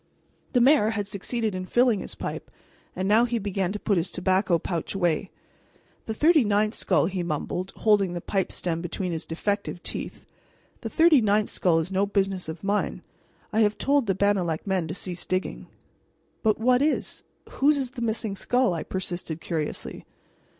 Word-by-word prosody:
The 245 - +4
mayor 260 -4 +5
had 205 -3 -2
succeeded 215 +2 -2
in 185 0 -4
filling 240 -2 +3
his - - -7
pipe, - - -5 0.5
and 185 +1 -2
now 215 +3 +5
he 240 0 -1
began 195 -3 -1
to 210 - -4
put 205 -2 +1
his 170 +2 0
tobacco 185 -1 +1
pouch 170 +2 -4
away. 175 0 0 0.8
"The 220 - -2
thirty 310 +2 +5
ninth 210 0 +1
skull," 185 - +2
he 185 +1 -2
mumbled, 175 +3 -3
holding 205 -4 +2
the 175 - -3
pipe 190 +2 -1
stem 170 -2 -3
between 180 +1 -3
his 165 -1 -4
defective 200 +1 -2
teeth - - -5 0.6
"the - - -4
thirty 320 -5 +5
ninth 210 0 +2
skull 175 -3 +2
is 165 +3 -1
no 195 +1 +1
business 195 -3 -1
of 160 +3 -7
mine. 205 +1 -1 0.5
I 220 - +2
have 210 -1 +3
told 280 -4 +2
the 195 - +1
Bannalec 190 -5 +1
men 190 -4 0
to 165 - -5
cease 180 -2 -4
digging." 185 +1 -3 0.7
"But 215 -2 +2
what 250 +2 +3
is 300 +1 0 0.3
whose 290 +2 +2
is 260 -3 -2
the 255 -2 -8
missing 220 -2 -2
skull?" 245 +1 +1
I 165 - -3
persisted 175 -3 -4
curiously. 160 -3 -4
200 Hz, 180 wpm, -26 LUFS, 180-220 Hz, 0.8 s, mayor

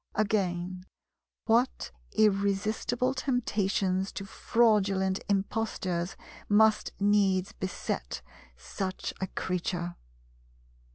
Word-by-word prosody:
Again, 185 -3 -1 0.6
what 235 +3 +2 0.2
irresistible 215 +4 +2
temptations 205 -7 0
to 195 - -5
fraudulent 195 -4 +2
impostures 195 -3 -1 0.3
must 215 +1 +4
needs 200 -2 +3
beset 120 - -4 0.3
such 185 - -4
a 190 - 0
creature! 175 -1 -3
195 Hz, 70 wpm, -29 LUFS, 185-215 Hz, 0.6 s, must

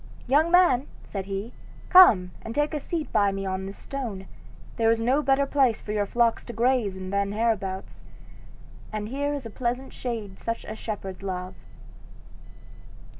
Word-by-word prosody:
"Young 295 +6 +3
man," 340 -7 +4 0.2
said 195 -2 -6
he, 200 +4 -4 0.4
"come 215 - +7
and 225 +1 -7
take 295 +2 +1
a 300 - -1
seat 315 +2 -4
by 205 -2 +4
me 195 0 -4
on 190 0 -3
this 195 - -8
stone. 235 -9 -5 0.5
There 225 -1 +3
is 230 0 +3
no 255 +6 +2
better 280 -1 +3
place 270 -5 +2
for 210 - -7
your 205 -1 0
flocks 235 +1 +2
to 240 - -7
graze 235 -4 +1
in 185 0 -6
than 200 0 0
hereabouts, 205 -4 -2 0.9
and 215 0 -4
here 285 +3 -1
is 285 -4 -4
a 225 - -7
pleasant 250 +3 -3
shade 220 -6 -5
such 230 0 -4
as 220 - -7
shepherds 195 -4 -5
love." 185 -1 -4
225 Hz, 170 wpm, -26 LUFS, 195-265 Hz, 0.9 s, come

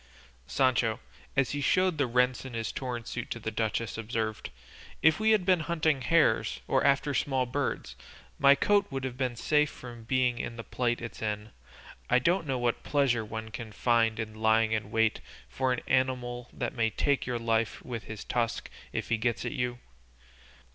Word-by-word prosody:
Sancho, 120 -4 +2 0.4
as 135 -2 +3
he 145 - -2
showed 185 +2 +2
the 140 - +2
rents 125 +1 +2
in 130 -3 -7
his 115 -1 -2
torn 125 -3 -4
suit 125 +1 -5
to - - -3
the 110 - -4
duchess, 110 0 -2
observed, 110 -1 -3 0.5
"If 160 +4 +5
we 220 0 +3
had 215 -4 +4
been 185 -2 +4
hunting 155 -3 +1
hares, 165 +4 +2
or - - +2
after 140 +1 +3
small 135 -2 +1
birds, 135 +3 -3 0.4
my 140 0 +7
coat 205 +5 +3
would 135 -1 -4
have 130 -2 -3
been 125 -2 -1
safe 150 +5 +2
from 120 -2 -10
being 125 -1 +1
in 115 - -4
the 115 - -6
plight 120 0 -1
it's 115 - -7
in; 105 0 -3 0.6
I 125 - +5
don't 170 +4 +1
know 135 -2 0
what 120 -1 0
pleasure 135 -6 +1
one 110 +1 -6
can 115 -1 -7
find 115 +1 +2
in 110 -1 -4
lying 110 0 +4
in 110 -2 -1
wait 115 0 +2 0.3
for 130 -1 -1
an 125 - -1
animal 125 -1 0
that - - -3
may 115 -4 +1
take 140 +4 0
your 125 -1 -1
life 115 -1 0
with 120 -3 -5
his 110 -1 -7
tusk 115 -1 -2 0.2
if - - -3
he 115 - +2
gets 110 -3 -1
at - - -2
you. 125 -4 -2
125 Hz, 190 wpm, -29 LUFS, 115-135 Hz, 0.6 s, my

